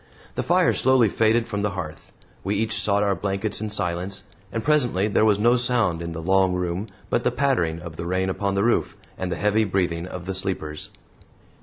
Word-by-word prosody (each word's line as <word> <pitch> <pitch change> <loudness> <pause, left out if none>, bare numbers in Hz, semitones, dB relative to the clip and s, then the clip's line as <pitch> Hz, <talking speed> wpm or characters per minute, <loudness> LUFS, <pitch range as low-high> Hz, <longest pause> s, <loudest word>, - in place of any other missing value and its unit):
The - - -2
fire - - +3
slowly 130 -4 +4
faded 115 +3 +2
from 105 -3 -2
the 105 - +1
hearth; 80 -4 -7 0.3
we 100 +2 -1
each 110 +1 0
sought 100 0 +2
our 100 -1 +2
blankets 100 +3 -3
in 110 - -2
silence; 90 0 -2 0.3
and 115 +1 -3
presently 125 -10 +2
there 110 +1 +3
was 105 -2 +4
no 120 +4 +4
sound 120 -9 +1
in 85 0 -4
the 80 0 -6
long 95 0 +3
room 90 +3 -2 0.2
but 120 - +1
the - - +3
pattering 120 -11 0
of 85 -2 -9
the 85 - -4
rain 95 +1 0
upon 100 +1 -1
the 100 - +2
roof 120 +1 +1 0.2
and 95 -1 -4
the - - 0
heavy 105 +1 +2
breathing 90 -4 -1
of 90 -1 -7
the 95 - -3
sleepers. 80 -5 -3
100 Hz, 205 wpm, -24 LUFS, 90-110 Hz, 0.3 s, slowly